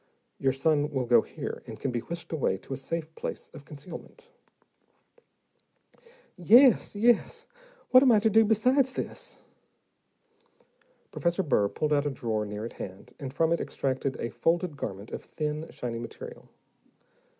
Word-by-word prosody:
Your 135 - +2
son 145 +2 +1
will 135 -4 -1
go 120 0 +5
here, - - -6
and - - -8
can 135 - -2
be 120 - -1
whisked 170 +8 -7
away 130 -11 0
to 135 - -8
a - - -3
safe 160 +3 -4
place - - -6
of 140 - -12
concealment." 175 - -11 2.0
"Yes, 230 +7 +5
yes. 230 +2 +2 0.5
What 255 - +9
am 265 -2 +6
I 220 - +6
to 220 +2 +3
do 225 +2 +6
besides 250 +5 +3
this?" - - -6 1.7
Professor 170 +2 0
Burr 105 - +2
pulled 150 +6 -1
out 145 0 +2
a - - +1
drawer 110 -5 -2
near 105 +1 -5
at 115 - -7
hand, 95 0 -9
and 135 -3 -5
from 160 +3 +1
it 170 - +1
extracted 135 0 -2
a 115 - -3
folded 165 - 0
garment 100 -5 -6
of - - -6
thin, 150 0 -4
shiny 115 -2 -5
material. 120 - -9
150 Hz, 155 wpm, -28 LUFS, 130-185 Hz, 2.0 s, What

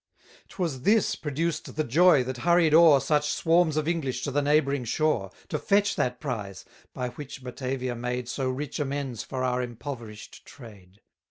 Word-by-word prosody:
'Twas 165 -9 -3
this 210 - +3
produced 160 +2 -3
the 155 - 0
joy 150 +1 +5
that 130 0 -5
hurried 170 +1 +3
o'er 160 -3 +7
Such 150 +2 +1
swarms 165 0 +2
of 155 0 0
English 135 -7 -2
to 140 - -2
the 145 +2 +1
neighbouring 140 -2 +2
shore, 120 -5 0 0.2
To - - -2
fetch 200 0 +2
that 125 0 -1
prize, 105 -9 -5 0.3
by 125 -1 -4
which 135 0 -9
Batavia 130 0 -4
made 125 +1 -3
So 130 +1 -2
rich 140 +3 -4
amends 140 -5 -3
for 130 -1 -4
our 125 0 0
impoverish'd 120 -3 -8
trade. 100 -6 -15
135 Hz, 165 wpm, -26 LUFS, 125-155 Hz, 0.3 s, o'er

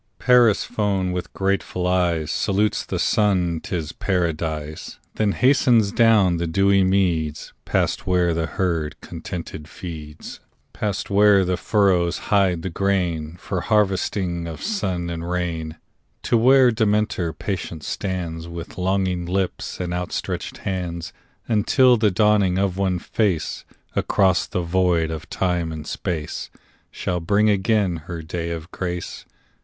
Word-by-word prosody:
Persephone 105 -5 +2
with 90 -1 -4
grateful 95 -2 -1
eyes 85 -4 +1
Salutes 105 +1 +1
the - - -4
Sun—'tis 90 -5 0
Paradise: 80 -4 -2 0.2
Then 105 -2 +1
hastens 125 -5 +4
down 105 -7 +4
the 85 0 -2
dewy 95 +3 +3
meads, 85 -5 0
Past - - 0
where 90 -2 +2
the 80 -1 -1
herd 85 -5 -2
contented 85 -2 -7
feeds, 80 -4 -9 0.3
Past 105 -2 -3
where 100 -1 +5
the 90 0 0
furrows 90 -2 +2 0.2
hide 95 -5 +3
the 95 - -3
grain, 85 -4 -1
For 95 0 -3
harvesting 95 -3 0
of 80 -2 -7
sun 90 - -2
and 85 0 -5
rain; 85 -3 -3 0.5
To - - +1
where 130 +2 +6
Demeter 105 -6 +1
patient 85 -2 -5
stands 85 -4 -4
With 85 +1 -8
longing 95 -1 0
lips 95 +1 -2
and 90 -1 -3
outstretched 90 0 -4
hands, 90 -3 -3 0.3
Until 125 +3 +4
the 110 -2 +3
dawning 100 -1 +3
of 95 -2 0
one 95 -2 0
face 90 - -1 0.3
Across 95 -2 +2
the 90 - -2
void 85 -2 +1
of 80 -1 -7
time 90 -3 -1
and 80 -1 -6
space 80 -1 -4 0.4
Shall 90 -1 -3
bring 105 +5 +3
again 100 -3 +1
her 85 -2 -5
day 85 +1 -4
of 85 +1 -6
grace. 90 -1 -5
90 Hz, 130 wpm, -22 LUFS, 85-100 Hz, 0.5 s, where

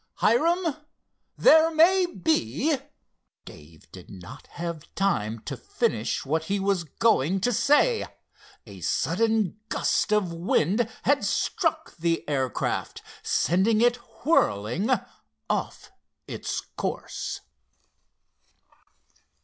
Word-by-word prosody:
Hiram, 330 +6 +2 0.6
there 320 -8 +6
may 350 +3 +4
be——" 175 - 0 0.7
Dave 75 +1 -15
did 90 -2 -12
not 90 -2 -11
have 170 -3 -7
time 115 - 0
to - - -5
finish - - -2
what 160 +3 -1
he 200 +4 -1
was 195 -3 0
going 185 +1 +1
to 245 +5 +1
say. 295 - +3 0.6
A - - -12
sudden 220 +1 0
gust - - 0
of 205 -5 +1
wind 185 +6 +1
had 285 +1 +2
struck 320 -3 -1
the 165 0 -1
air 135 -3 0
craft, - - -3 0.2
sending 195 +6 +2
it 240 +1 +3 0.3
whirling 120 - +1 0.6
off - - -4 0.4
its - - -4
course. - - -5
195 Hz, 100 wpm, -26 LUFS, -, 0.7 s, there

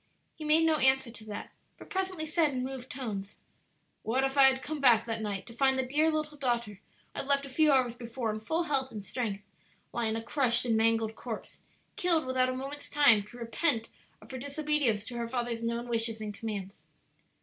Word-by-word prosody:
He 315 - -10
made 310 +2 +4
no 320 -1 +3
answer 265 -3 +3
to 225 -1 -10
that, 210 -1 -7 0.3
but - - -14
presently 375 -4 -2
said 315 0 +2
in 255 -3 -3
moved 260 -1 -6
tones, 210 -7 -5 0.6
"What 255 +4 0
if 270 0 0
I 275 -1 +7
had 265 0 +2
come 300 0 -4
back 235 -4 +5
that 225 -1 -3
night 200 -3 -3
to 235 - -11
find 265 +2 +3
the 260 - +1
dear 300 +5 +2
little 305 -1 -3
daughter 235 -6 -1 0.3
I - - -5
had - - -4
left 280 0 +2
a - - -9
few 305 +3 +4
hours 255 -3 +3
before 235 -1 -4
in 215 - -4
full 320 +10 -1
health 275 -5 +1
and 210 -2 -7
strength, 205 -5 -3 0.5
lying 225 -2 0
a 225 - -4
crushed 245 -1 +1
and 230 -2 +2
mangled 225 0 +2
corpse? - - -7 0.4
killed 335 -4 +3
without 255 0 +1
a 255 - -2
moment's 275 +3 -6
time 280 -8 +5
to 240 - -13
repent 230 0 +1 0.3
of - - -13
her 260 - -5
disobedience 285 -6 0
to 240 0 -6
her 235 -1 -2
father's 240 -1 -2
known 235 +1 -2
wishes 225 -1 +1
and 210 -1 -5
commands? 200 -2 -6
255 Hz, 210 wpm, -30 LUFS, 225-280 Hz, 0.6 s, I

